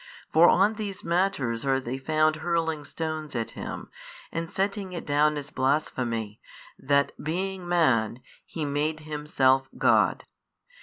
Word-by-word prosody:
For 165 +2 +7
on 205 +3 +3
these 205 -3 -4
matters 170 -10 0
are 135 -1 +2
they 130 +1 -5
found 155 +2 +2
hurling 160 -2 -1
stones 155 -1 -4
at 115 -1 -2
Him, - - -7 0.4
and 165 0 -3
setting 195 0 -2
it 170 - -5
down 150 +1 +2
as 145 0 -6
blasphemy, 125 -6 -1 0.4
that 140 +1 +2
being 185 +3 -3
Man, 130 -9 +2 0.2
He 160 -3 -5
made 150 +2 -1
Himself 140 -3 +1
God. - - +3
155 Hz, 135 wpm, -27 LUFS, 135-170 Hz, 0.4 s, For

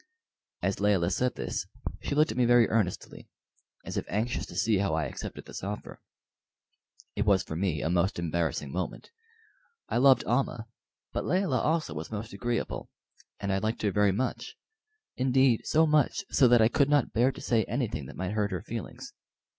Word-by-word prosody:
As 95 - 0
Layelah 100 -4 +2
said 125 +6 0
this - - -3 0.3
she - - -2
looked 155 +1 +3
at 110 - -6
me - - +5
very 120 -1 +5
earnestly, 105 -5 -2 0.6
as - - -5
if - - -2
anxious 110 +5 -1
to - - -11
see 110 -3 +2
how 100 -5 +1
I 80 -2 0
accepted - - -7
this - - -8
offer. 105 +2 -6 1.1
It 105 - +1
was 100 -3 +3
for 80 - -6
me 85 -4 -1
a 80 - 0
most 90 +4 +1
embarrassing 80 -5 -2
moment. 90 - -5 0.8
I - - 0
loved 130 -1 +6
Almah, 120 -2 0 0.5
but - - -1
Layelah 180 -9 +1
also 160 - 0
was 75 +2 -6
most 110 +1 -6
agreeable, 120 -1 -3 0.5
and 100 -1 -1
I 95 - +1
liked 110 +3 -2
her 105 - +2
very 105 0 +3
much; 120 +7 -3 0.6
indeed, 130 -2 +3
so 160 +1 +4
much 155 +6 +2
so 130 - +5
that 120 -2 +6
I - - +6
could 140 +4 +2
not 145 -4 +2
bear 125 +4 +3
to 135 - -11
say 115 -5 +1
anything 110 - -3
that - - -10
might 95 +1 -3
hurt 105 -1 0
her 90 -3 -4
feelings. 115 -6 -7
110 Hz, 185 wpm, -28 LUFS, 95-125 Hz, 1.1 s, loved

